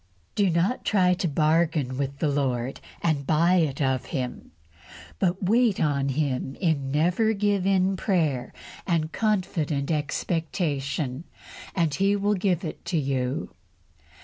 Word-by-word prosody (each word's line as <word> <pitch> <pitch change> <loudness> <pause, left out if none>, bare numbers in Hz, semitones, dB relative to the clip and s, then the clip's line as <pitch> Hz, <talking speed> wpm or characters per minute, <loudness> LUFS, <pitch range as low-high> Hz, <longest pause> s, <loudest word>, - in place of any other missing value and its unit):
Do 200 -2 +2
not 175 +8 +1
try 185 -3 +3
to 180 0 -1
bargain 155 -3 +1
with 140 +1 -3
the 155 - 0
Lord 135 -3 -1 0.2
and 145 -5 0
buy 170 +4 +4
it 155 -6 +1
of 130 -2 0
Him, 130 -5 -4 0.7
but 180 +2 0
wait 225 +1 +3
on 140 -2 +1
Him 135 -1 -1
in 155 -7 0
never 180 +9 +2
give 200 -2 +1
in 190 0 +3
prayer 155 - 0 0.4
and 165 -3 0
confident 170 -10 0
expectation, 150 -2 -2 0.5
and 165 -5 +1
He 195 +5 +2
will 205 +1 +1
give 185 -3 0
it 155 - -6
to 170 0 -1
you. 135 -2 -2
160 Hz, 135 wpm, -26 LUFS, 140-185 Hz, 0.7 s, buy